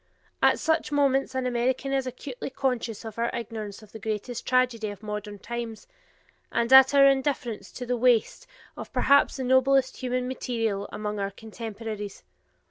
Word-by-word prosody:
At - - +5
such 320 -2 0
moments 275 -2 +2
an 260 -1 -1
American 250 +2 0
is 270 -1 0
acutely 255 +1 -6
conscious 250 -5 -2
of 220 0 -7
our 235 0 +1
ignorance 215 -2 -6
of 210 - -16
this 220 - -10
greatest 220 +2 -4
tragedy 250 -4 +2
of 205 +1 -9
modern 210 -1 -5
times, 235 +1 -6 0.7
and 235 +2 +1
at 265 +1 +9
our 275 0 +8
indifference 265 -6 0
to 250 - -6
the 245 +1 0
waste 245 - +2 0.3
of - - -8
perhaps 280 0 +4
the 265 - -3
noblest 260 +1 +3
human 250 0 -2
material 225 -6 -2
among 210 0 -4
our 195 0 -1
contemporaries. 215 -1 -7
240 Hz, 160 wpm, -26 LUFS, 220-260 Hz, 0.7 s, at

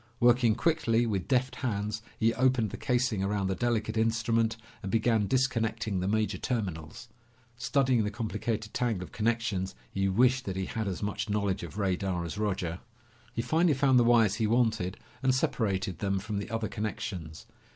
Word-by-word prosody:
Working 120 -2 +4
quickly 120 -5 +2
with 100 -5 -2
deft 130 -1 +1
hands, 105 -3 -2 0.2
he 115 +1 +3
opened 125 -5 +2
the - - -5
casing 125 -5 0
around 100 0 0
the 95 0 0
delicate 115 +1 -1
instrument 115 0 +1 0.2
and 95 - -4
began 110 -1 +2
disconnecting 115 -6 0
the 90 - -1
major 110 +1 0
terminals. 95 - -4 0.5
Studying 125 -1 +2
the 105 - 0
complicated 110 0 -3
tangle 115 -7 0
of - - -10
connections, 110 - -1 0.2
he 95 0 0
wished 125 +6 +3
that 95 - -3
he 95 0 -2
had 110 +1 -3
as 95 +1 -3
much 105 +1 -2
knowledge 100 -2 0
of 85 0 -8
radar 95 -3 -1
as 85 +4 -5
Roger. 90 -5 -1 0.5
He 115 - -2
finally 160 +4 +3
found 135 -1 +4
the - - +5
wires 115 -4 +5
he 110 - +3
wanted 110 -4 +1 0.2
and 130 -1 +3
separated 95 -8 -1
them 100 -1 0
from 100 +1 -3
the 100 - -6
other 115 0 -2
connections. 95 -7 -5
110 Hz, 170 wpm, -29 LUFS, 95-120 Hz, 0.5 s, the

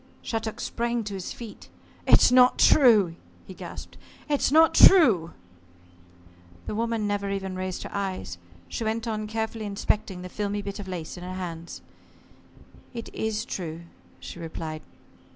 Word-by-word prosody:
Shattuck 225 -1 -3
sprang 235 0 -2
to 205 -1 -6
his 190 -2 -5
feet. 230 -3 -10 0.4
"It's - - +6
not 250 0 +6
true!" 215 - +5 0.3
he - - -10
gasped. - - -10 0.3
"It's 290 -2 +1
not 320 +2 +6
true!" 225 - +6 1.3
The - - -4
woman 230 0 -1
never 205 -1 -1
even 195 -1 -3
raised 185 0 -4
her - - -8
eyes. 190 - -4 0.3
She 230 - -4
went 225 +1 -2
on 215 -1 -3
carefully 220 0 -3
inspecting 200 -2 -2
the - - -6
filmy 205 +2 -3
bit 200 +1 -6
of 200 - -7
lace 180 -2 -6
in 175 - -9
her 185 +1 -6
hands. 170 -2 -7 1.1
"It 230 - -7
is 220 -1 -2
true," 165 -3 -5 0.4
she - - -9
replied. 160 -1 -6
205 Hz, 150 wpm, -26 LUFS, 185-225 Hz, 1.3 s, It's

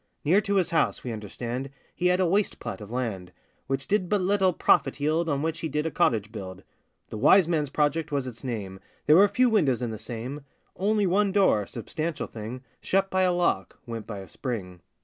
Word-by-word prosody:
Near 185 +8 +4
to 200 -1 -1
his 185 -3 +2
house, 165 - +1
we 125 - -4
understand, 120 +5 -5 0.2
He 180 - 0
had 180 +1 +3
a 185 - +3
waste 195 +4 +1
plat - - -6
of 105 - -9
land, 110 -7 -3 0.4
Which 135 0 -2
did 195 -3 +1
but 210 - +2
little 190 0 +2
profit 165 - +2
yield, 160 +3 +1
On 140 0 0
which 160 0 -2
he 160 - -3
did 150 +2 -1
a 160 - -1
cottage 110 -5 +1
build. 95 -4 -8 0.5
The 110 - -6
Wise 190 - +6
Man's 155 -4 0
Project 150 +2 0
was 140 -2 -1
its 120 -2 -8
name; 100 -7 -5 0.3
There 155 +2 +6
were 200 +2 +7
few 255 +4 +3
windows 150 - +2
in 120 - -2
the 110 - -6
same; 125 +6 -6 0.3
Only 205 +1 +1
one 195 +2 +2
door, 185 - +3
substantial 155 +6 -4
thing, 115 +4 -7 0.2
Shut 195 0 +1
by 185 - +2
a 185 -1 +3
lock, 175 - 0
went 115 -2 -6
by 105 - -5
a 95 -1 -8
spring. 95 -9 -5
150 Hz, 210 wpm, -26 LUFS, 115-185 Hz, 0.5 s, were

